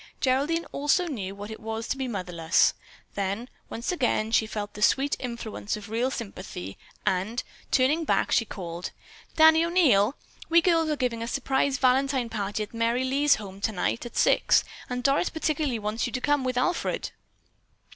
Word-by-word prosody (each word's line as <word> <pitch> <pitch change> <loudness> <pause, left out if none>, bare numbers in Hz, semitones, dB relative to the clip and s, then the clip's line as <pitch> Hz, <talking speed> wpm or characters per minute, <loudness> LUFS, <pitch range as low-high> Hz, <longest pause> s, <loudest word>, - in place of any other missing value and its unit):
Geraldine 285 +6 +1
also 295 +6 +2
knew 200 - -4
what 205 +2 -8
it 220 - -8
was 225 +1 -4
to - - +1
be 265 -1 -3
motherless. 180 -6 +1 0.4
Then, 200 +4 -2 0.2
once 235 +8 -3
again, 245 -9 0
she 220 -1 +3
felt 210 -1 -5
the 210 - -9
sweet 275 +5 +3
influence 235 -4 -4
of 210 -1 -10
real 240 +3 +1
sympathy, 190 - -6 0.3
and, 195 +6 0 0.3
turning 285 +6 +3
back, - - +1
she 230 - +4
called: 175 -5 -6 0.5
"Danny 320 +1 +7
O'Neil, 285 - +3 0.3
we 335 +1 +6
girls 330 -2 +2
are 305 - +1
giving 245 -4 -1
a 230 - -3
surprise 270 +1 0
Valentine 260 -1 +2
party 210 -1 -2
at 210 - -11
Merry 230 +2 +1
Lee's 280 +3 +3
home 195 -2 -9
tonight 210 +1 -1
at 240 - -8
six, - - +4 0.3
and 250 0 -3
Doris 275 +6 +2
particularly 310 -5 -1
wants 215 +3 -2
you 240 - -8
to - - -1
come 290 +1 +1
with 255 -1 -1
Alfred." 340 +8 -1
245 Hz, 170 wpm, -27 LUFS, 210-280 Hz, 0.5 s, Danny